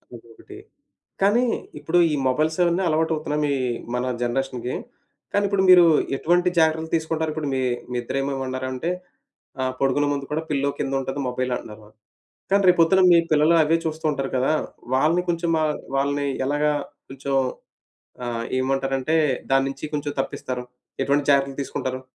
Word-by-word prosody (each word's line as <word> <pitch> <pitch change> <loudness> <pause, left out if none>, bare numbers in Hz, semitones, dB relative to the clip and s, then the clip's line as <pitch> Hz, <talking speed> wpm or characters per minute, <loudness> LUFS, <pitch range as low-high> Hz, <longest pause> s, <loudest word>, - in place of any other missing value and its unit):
ఇంకొకటి 115 -1 -14 0.6
కానీ, 210 +6 +4 0.3
ఇప్పుడు 175 +2 +1
ఈ - - +2
మొబైల్స్ 155 +5 +1
అవన్నీ 175 +2 +1
అలవాటవుతున్నాయి 155 -2 0
మీ 145 - +1 0.4
మన 125 +1 -1 0.2
జనరేషన్‌కి. 125 0 -2 0.6
కానీ 205 - +2
ఇప్పుడు 195 -1 +1
మీరు 180 -1 +9 0.3
ఎటువంటి 175 +4 +2
జాగ్రత్తలు 160 0 +1
తీసుకుంటారిప్పుడు 160 -1 -2
మీ 130 - 0 0.3
మీ - - -3
ఇద్దర 125 - -3
ఏమో 140 +1 -2
ఏమన్నారంటే 130 +3 -3 0.7
ఆహ్, 130 0 -1
పడుకునే 135 +2 +2
ముందు 140 -1 -2
గూడా 155 +2 -1
పిల్లో 140 -1 0
కిందుంటది 135 0 -2
మొబైల్ 125 0 -2
అన్నారు. 105 0 -11
మా - - -17 0.6
కానీ 200 0 +4
రేపొద్దున 180 +2 +4
మీ 170 - +7
పిల్లలు 155 +2 +4
అవే 160 +2 +2
చూస్తూ 160 0 -4
ఉంటారు 135 -2 -3
కదా. 130 +4 +2 0.4
వాళ్ళని 155 +7 +3
కొంచెం 170 0 0
మా 155 - +1 0.3
వాళ్ళని 140 +1 0 0.2
ఎలాగా 145 +2 +1 0.4
కొంచెం 135 +1 -3 0.9
ఆహ్, 115 -1 -3 0.2
ఏమంటారంటే 135 +3 0 0.4
దాన్నించి 135 +1 +1
కొంచెం 145 0 -2
తప్పిస్తారు? 130 -2 -4 0.4
ఎటువంటి 140 +1 +1
జాగ్రత్తలు 140 -1 +2
తీసుకుంటారు? 130 -1 -4
145 Hz, 140 wpm, -23 LUFS, 135-160 Hz, 0.9 s, మీరు